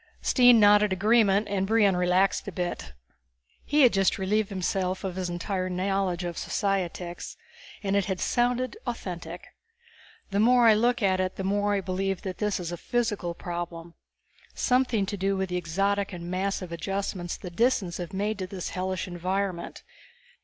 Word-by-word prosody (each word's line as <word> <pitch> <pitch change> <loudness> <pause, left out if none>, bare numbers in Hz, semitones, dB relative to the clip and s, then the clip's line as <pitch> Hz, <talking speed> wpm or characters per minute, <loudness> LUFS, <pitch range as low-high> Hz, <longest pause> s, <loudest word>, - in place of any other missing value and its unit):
Stine 245 -3 +6
nodded 210 0 +5
agreement 205 +1 +3
and 195 -1 -1
Brion 210 -3 +4
relaxed 180 +3 +2
a - - -3
bit. 175 - -4 0.7
He 295 0 +3
had 250 - +6
just 195 -1 +2
relieved 205 +2 0
himself 185 -1 -2
of 190 -2 -3
his 185 -1 -3
entire 185 +2 -2
knowledge 185 -1 -1
of 175 -1 -4
societics, 180 -3 -3 0.5
and 195 0 0
it 200 -2 +2
had 190 -2 -3
sounded 245 +1 0
authentic. 175 -7 -5 0.9
"The 200 - 0
more 240 +2 +5
I 220 - +8
look 240 +2 +1
at 190 -1 +2
it 185 0 -1
the 195 - -4
more 205 +1 +1
I 200 - 0
believe 190 +1 -2
that 185 -2 -5
this 210 -2 0
is 175 -1 -4
a 175 - -4
physical 210 -6 -2
problem, 170 -1 -6 0.6
something 250 -5 +2
to 205 +1 -4
do 195 +1 0
with 190 -1 -2
the 180 - -1
exotic 195 +4 0
and 175 0 -6
massive 185 -1 -2
adjustments 185 0 -3
the 180 - -8
Disans 195 -4 +1
have 175 -1 -5
made 205 +2 -2
to 185 - -3
this 185 -2 -5
hellish 185 0 -3
environment. 185 0 -3
195 Hz, 165 wpm, -27 LUFS, 180-205 Hz, 0.9 s, I